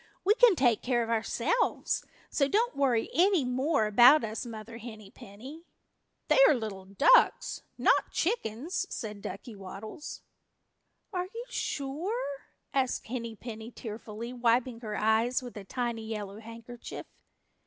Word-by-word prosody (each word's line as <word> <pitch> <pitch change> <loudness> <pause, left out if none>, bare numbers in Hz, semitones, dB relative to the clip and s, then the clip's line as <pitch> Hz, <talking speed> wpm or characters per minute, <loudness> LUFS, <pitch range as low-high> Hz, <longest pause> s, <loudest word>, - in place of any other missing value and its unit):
We 410 - +6
can 485 -3 +6
take 240 -7 +3
care 240 -2 +1
of 230 - -4
ourselves, 235 - 0 0.2
so 275 - +2
don't 460 - +1
worry 250 -5 +1
any 360 -4 +4
more 260 0 +1
about 240 +8 +7
us, 220 +2 -4
Mother 230 0 -8
Henny 220 -4 -10
Penny." 265 - -12 0.6
"They - - +4
are - - +5
little 210 -5 -5
ducks, 475 - +4 0.2
not - - +3
chickens," 330 - -1
said 210 -2 -6
Ducky 205 +5 -7
Waddles. 200 - -8 0.9
"Are 360 -1 -1
you 465 +5 -8
sure?" 290 - -3 0.3
asked 265 -2 0
Henny 230 -1 -5
Penny 225 0 -8
tearfully, 225 0 -7
wiping 240 0 +1
her 215 -3 -5
eyes 225 +4 +2
with 245 - -9
a 205 - -7
tiny 230 +1 -3
yellow 210 -2 -5
handkerchief. 230 +1 -9
240 Hz, 135 wpm, -29 LUFS, 220-285 Hz, 0.9 s, about